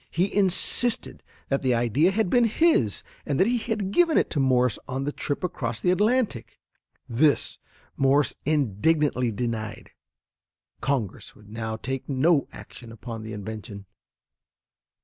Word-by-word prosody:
He 185 +4 0
insisted 195 - +1 0.3
that 135 - 0
the 130 -2 +2
idea 120 - +2
had 210 +1 0
been 240 +5 +3
his 225 - +2 0.2
and 145 0 -2
that 190 - +5
he 240 +2 +1
had 215 -4 -3
given 335 +6 +3
it - - +1
to 150 - -1
Morse 125 -3 +2
on 130 +1 -3
the 145 - -2
trip 145 +3 -4
across 120 -10 -3
the 180 - +2
Atlantic. 210 - 0 0.5
This 140 +5 +1 0.4
Morse 135 +1 +3
indignantly 145 -1 +1
denied. 110 -1 -4 0.9
Congress 130 -8 -2
would 105 -1 -18
now 110 0 -4
take 135 +4 -5
no 140 +2 +2
action 120 -2 -12
upon 115 0 -8
the 110 0 -7
invention. 105 -1 -7
135 Hz, 140 wpm, -25 LUFS, 115-180 Hz, 0.9 s, that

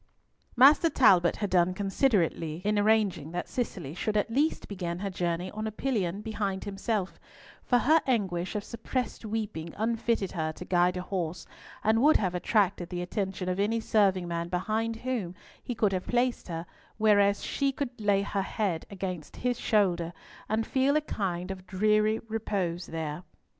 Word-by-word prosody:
Master 285 +6 +7
Talbot 185 - +5
had 205 -1 -3
done 180 0 +3
considerately 185 - 0
in 210 0 +2
arranging 205 -7 +2
that 175 - -3
Cicely 180 - -4
should 210 +4 -1
at 210 +2 0
least 290 +6 +1
begin 175 -4 -4
her 195 +1 -3
journey 175 0 -2
on 215 +1 -4
a - - -3
pillion 210 -6 -1
behind 205 -3 -2
himself, 200 -1 -2 0.4
for 245 - +2
her 310 +6 +4
anguish 190 -7 0
of 210 - -2
suppressed 235 +3 -4
weeping 205 -7 -4
unfitted 225 -2 0
her 160 -3 -2
to 180 - -9
guide 180 0 +2
a 180 - -3
horse, 180 -3 -3 0.4
and 220 +1 +3
would 300 +3 +6
have 185 -4 -1
attracted 190 -1 +1
the 175 -1 -3
attention 190 0 -3
of 185 +1 -1
any 220 +3 +1
serving 195 -5 +2
man 170 0 -3
behind 215 +5 -1
whom 225 -7 -3 0.3
he 245 - -4
could 210 -3 +2
have 185 -1 -2
placed 245 0 0
her, 165 -1 -4 0.3
whereas 205 -2 +4
she 275 -1 0
could 270 -2 -3
lay 200 -1 +3
her 200 0 -1
head 190 -4 -2
against 185 -5 -5
his 245 -1 -1
shoulder, 175 -6 +1 0.4
and 220 +1 +1
feel 270 +1 +2
a 305 - +3
kind 190 -9 -3
of 185 -1 -8
dreary 215 +3 +2
repose 195 -6 -2
there. 160 -1 -4
200 Hz, 170 wpm, -29 LUFS, 180-225 Hz, 0.4 s, Master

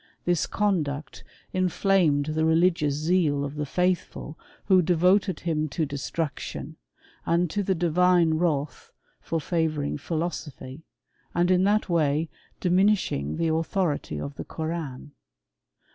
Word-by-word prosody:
This 175 -2 +1
conduct 155 -8 -1 0.3
inflamed 185 -5 +2
the 160 0 0
religious 160 -2 +3
zeal 155 -2 +1
of 140 - -5
the 150 0 -3
futh 180 +3 +2
ful, 150 - -10 0.3
who 190 -2 +5
devoted 180 +3 +2
him 155 -2 -1
to 160 +3 -1
destruction, 145 +1 -4 0.5
and 170 0 +1
to 205 - 0
the 190 -1 0
divme 175 -1 +3
wrath, 150 -4 -1 0.3
for 165 - -2
favouring 155 -3 -1
philosophy, 155 -3 -5 0.5
and 175 +1 +3
in 185 +1 +4
that 210 +1 +3
^ay 160 -2 +1 0.3
diminishing 180 - +1
the 165 - +1
authority 165 -1 -1
of 140 0 -6
the - - -4
Koran. 155 -4 -5
165 Hz, 125 wpm, -26 LUFS, 150-180 Hz, 0.5 s, who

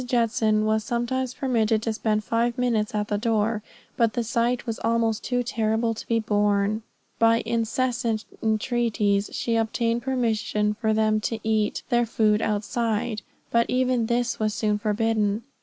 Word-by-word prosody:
Judson 225 -3 +1
was 215 0 +1
sometimes 245 +2 -2
permitted 225 -4 +1
to 225 - -1
spend 215 -1 0
five 230 +2 0
minutes 230 -4 0
at 210 0 -1
the 205 -1 -1
door, 220 -1 0 0.4
but 230 -2 +2
the 240 - -1
sight 235 +2 0
was 230 -2 -4
almost 230 -1 +1
too 245 -1 0
horrible 225 +1 +1
to 220 - -9
be 230 - +2
borne. 205 0 +1 0.4
By 230 0 +4
incessant 230 0 -1 0.2
intreaties, 220 -2 +1
she 230 - -1
obtained 230 +1 0
permission 220 -4 0
for 220 0 -1
them 215 0 +2
to 225 +1 -2
eat 215 -1 0
their 240 -1 +2
food 215 -1 +2
outside, 220 +1 -1 0.3
but 235 0 +3
even 250 -2 +1
this 240 +1 0
was 215 -1 0
soon 210 -1 0
forbidden. 215 0 0
225 Hz, 155 wpm, -25 LUFS, 215-235 Hz, 0.4 s, By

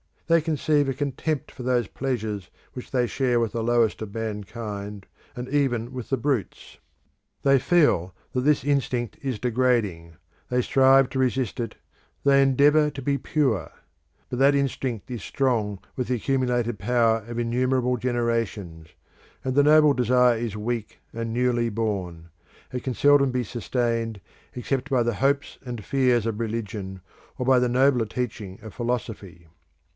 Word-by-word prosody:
They 165 0 +4
conceive 150 -2 +1
a 135 - 0
contempt 140 +2 -3
for - - -10
those 125 -3 +1
pleasures 110 -8 -3 0.2
which 125 - -8
they 125 -2 +1
share 125 0 +1
with 115 -2 0
the 115 - -3
lowest 115 -2 +2
of 105 -1 -7
mankind, 105 -2 -5 0.3
and 125 0 -5
even 130 -5 0
with 125 -3 -6
the 135 - +1
brutes. 130 -6 -3 0.6
They 135 -1 +5
feel 130 - +2 0.2
that 125 - -1
this 145 0 +2
instinct 130 -5 -1
is 130 -5 -2
degrading: 115 -9 0 0.4
they 125 0 +2
strive 135 0 +5
to 130 - -3
resist 130 -2 0
it; 115 - -4 0.5
they 140 -1 +5
endeavour 145 +3 +4
to 140 -1 -8
be 140 +2 0
pure. 130 - 0 0.6
But 125 - -4
that 140 +1 +5
instinct 130 -4 -2
is 120 -4 -4
strong 110 -6 -1 0.2
with 125 - -2
the 125 - +1
accumulated 120 -3 0
power 115 -2 +2
of 120 0 -6
innumerable 125 +1 +1
generations; 115 -9 -2 0.6
and 130 - -1
the 145 +2 +4
noble 150 0 +6
desire 125 -1 +3
is 110 -3 -4
weak 115 0 -4
and 115 0 -4
newly 120 -1 +1
born: 95 -7 -3 0.4
it 125 -1 -4
can 130 - -1
seldom 145 -2 +4
be 125 0 -1
sustained 115 -1 -2 0.4
except 135 +3 -2
by 130 -3 +2
the 115 -2 -1
hopes 140 +3 0
and 120 -5 -6
fears 125 -4 +2
of 115 -1 -2
religion, 105 -4 -4 0.4
or 125 - -2
by 130 0 +5
the 125 0 +1
nobler 125 -1 +3
teaching 105 -5 -5
of 110 - -9
philosophy. 110 -8 -4
125 Hz, 155 wpm, -25 LUFS, 110-135 Hz, 0.6 s, noble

